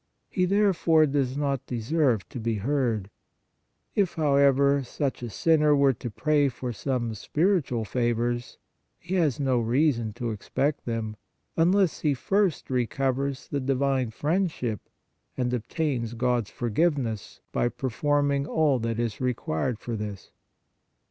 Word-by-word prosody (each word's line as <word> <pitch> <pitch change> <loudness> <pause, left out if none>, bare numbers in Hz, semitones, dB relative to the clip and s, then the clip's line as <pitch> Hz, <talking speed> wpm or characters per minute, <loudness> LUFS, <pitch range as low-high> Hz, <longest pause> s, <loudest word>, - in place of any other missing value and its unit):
He, 185 - +2
therefore, 180 -5 +4
does 135 -2 0
not 140 -3 -1
deserve 125 -2 0
to 125 - -6
be 115 0 -1
heard; 115 -3 -1 0.8
if, 195 -4 +1
however, 140 -2 +4
such 135 +2 -3
a 120 - -4
sinner 150 +4 +3
were 140 -1 +4
to 120 - -6
pray 145 +5 +2
for 125 -1 -5
some 120 -2 -2
spiritual 150 - 0
favors, 120 +2 -1 0.4
he 175 +3 -7
has 160 -9 +2
no 130 -3 +2
reason 120 -1 +1
to 120 +1 -3
expect 135 +7 -2
them, 110 -2 -3 0.4
unless 180 +2 +3
he 145 -3 +1
first 195 +1 0
recovers 135 +2 -1
the 145 - -2
divine 135 -1 +1
friendship 150 - -1 0.6
and 125 -1 0
obtains 125 -1 -2
God 120 -1 +1
s - - -15
forgiveness 120 -3 -1
by 120 - +1
performing 140 +3 0
all 150 -6 +2
that 115 0 -2
is 115 -1 -2
required 125 -3 -1
for 115 +1 -5
this. 105 -2 -6
130 Hz, 135 wpm, -26 LUFS, 120-150 Hz, 0.8 s, therefore